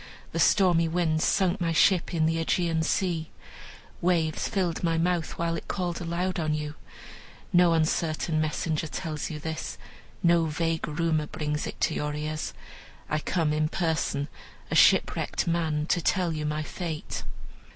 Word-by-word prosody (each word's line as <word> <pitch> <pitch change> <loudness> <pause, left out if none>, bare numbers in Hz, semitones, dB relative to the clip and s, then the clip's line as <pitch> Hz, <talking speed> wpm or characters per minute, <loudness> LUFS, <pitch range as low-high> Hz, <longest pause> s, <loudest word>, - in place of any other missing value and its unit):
The - - -2
stormy 175 -4 +4
winds 160 -2 +1
sunk 190 -1 +2
my 165 -1 +1
ship 180 +2 +4
in 165 -3 +1
the 165 +1 +1
Aegean 165 0 +1
Sea, 165 -1 0 0.7
waves 165 -3 +1
filled 185 -6 -1
my 165 -1 +2
mouth 170 -1 0
while 170 0 0
it 165 - -6
called 175 -3 -2
aloud 175 +2 -1
on 155 -2 0
you. 150 -1 -4 0.8
No 175 -1 +6
uncertain 160 0 +1
messenger 155 0 -1
tells 155 0 -4
you 155 - -5
this, 160 +1 -5 0.5
no 170 -1 +4
vague 165 +1 -1
rumor 155 -1 0
brings 150 0 -3
it - - -7
to 160 - +2
your 150 -1 -2
ears. 155 +1 -3 0.6
I 155 - +2
come 155 0 0
in 155 0 +1
person, 160 -5 -1 0.4
a - - +1
shipwrecked - - +4
man, 160 -3 0
to 175 - +2
tell 180 -1 +1
you 155 -1 -2
my 150 +1 -1
fate. 160 -1 -5
165 Hz, 155 wpm, -27 LUFS, 155-170 Hz, 0.8 s, No